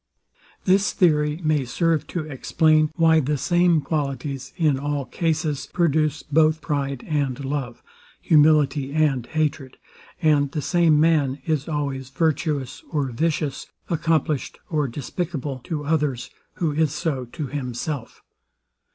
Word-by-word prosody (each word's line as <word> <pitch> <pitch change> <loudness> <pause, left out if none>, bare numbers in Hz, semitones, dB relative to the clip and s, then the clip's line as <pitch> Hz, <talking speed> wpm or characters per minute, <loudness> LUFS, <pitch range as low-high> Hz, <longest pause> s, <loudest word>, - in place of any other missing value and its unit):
This 195 +2 +3
theory 150 -3 +2
may 155 -3 +2
serve 160 +4 0
to 175 - -3
explain, 155 +1 +2
why 160 -2 +5
the 150 0 0
same 175 +1 +3
qualities, 140 -3 -3
in 150 -6 +2
all 145 -1 -2
cases, 155 -3 -1
produce 155 -3 +1
both 155 +1 +3
pride 140 -4 -2
and 140 -3 -1
love, 135 -4 -4 0.4
humility 150 -3 +3
and 150 -5 +2
hatred; 150 -3 -2 0.4
and 150 -4 +3
the 150 - -1
same 170 -4 +3
man 150 -4 +2
is 155 -1 -1
always 140 -4 -3
virtuous 150 -1 -1
or 145 -5 -1
vicious, 150 +1 -1 0.2
accomplished 160 -3 0
or 150 -3 +1
despicable 145 +1 -4
to 150 -3 -4
others, 145 -5 -1 0.2
who 165 -3 0
is 155 0 +1
so 145 -5 -2
to 145 +6 -6
himself. 130 -1 -5
150 Hz, 125 wpm, -23 LUFS, 140-160 Hz, 0.4 s, why